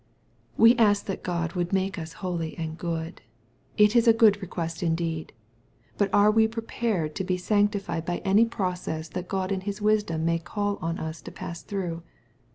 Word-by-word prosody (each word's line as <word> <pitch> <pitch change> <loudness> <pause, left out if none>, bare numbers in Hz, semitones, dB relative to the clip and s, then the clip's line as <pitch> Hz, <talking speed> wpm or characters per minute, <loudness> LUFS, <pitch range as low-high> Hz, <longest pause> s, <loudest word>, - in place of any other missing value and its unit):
We 230 +2 +7
ask 205 -3 +3
that 195 - -4
God 170 -2 -2
would 175 -1 -2
make 190 -2 0
us 160 0 -7
holy 170 -3 -3
and 160 -1 -4
good. 165 0 -4 0.6
It 210 +1 +5
is 235 0 +4
a 230 - +8
good 210 -3 +5
request 170 -3 -4
indeed. 165 -2 -1 0.7
But 200 -2 +2
are 205 +2 +5
we 220 0 +4
prepared 225 -7 -2
to - - -1
be 185 -1 0
sanctified 200 -3 0
by 175 +1 -2
any 200 +4 +5
process 180 -7 -3
that 180 +1 -5
God 190 0 -2
in 190 -1 -1
His 200 +1 -4
wisdom 210 -7 +1
may 165 0 +1
call 205 +4 -2
on 165 +1 -2
us 160 +1 -5
to - - -9
pass 170 0 -7
through 175 -4 -4
185 Hz, 180 wpm, -26 LUFS, 165-205 Hz, 0.7 s, a